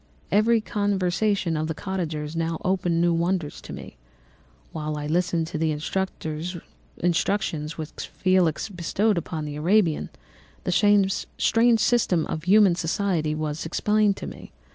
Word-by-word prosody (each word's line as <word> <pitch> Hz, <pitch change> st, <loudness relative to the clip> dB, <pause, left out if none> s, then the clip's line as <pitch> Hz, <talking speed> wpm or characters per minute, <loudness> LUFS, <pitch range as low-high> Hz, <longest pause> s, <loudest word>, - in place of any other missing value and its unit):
"Every 220 Hz, +2 st, +4 dB
conversation 200 Hz, -3 st, 0 dB
of 155 Hz, 0 st, -1 dB
the 160 Hz, -, -3 dB
cottagers 165 Hz, -6 st, -4 dB
now 165 Hz, 0 st, -1 dB
opened 180 Hz, -3 st, +1 dB
new 170 Hz, 0 st, +3 dB
wonders 170 Hz, -2 st, -1 dB
to -, -, -10 dB
me. -, -, -9 dB, 0.7 s
While 155 Hz, -1 st, -4 dB
I 150 Hz, -, -4 dB
listened 170 Hz, +1 st, 0 dB
to 155 Hz, -, -4 dB
the 160 Hz, 0 st, +1 dB, 1.3 s
instructions 165 Hz, -3 st, -1 dB
which 155 Hz, -1 st, -6 dB
Felix 185 Hz, -3 st, +1 dB
bestowed 195 Hz, +2 st, 0 dB
upon 155 Hz, -1 st, -5 dB
the 145 Hz, 0 st, -5 dB
Arabian, 170 Hz, 0 st, +2 dB, 0.5 s
the -, -, -1 dB, 0.7 s
strange 230 Hz, 0 st, +4 dB
system 215 Hz, -9 st, +2 dB
of 155 Hz, 0 st, -5 dB
human 200 Hz, -1 st, +6 dB
society 170 Hz, -2 st, -1 dB
was 155 Hz, 0 st, -3 dB
explained 210 Hz, +4 st, +1 dB
to -, -, -6 dB
me. -, -, -9 dB
175 Hz, 135 wpm, -25 LUFS, 160-200 Hz, 1.3 s, human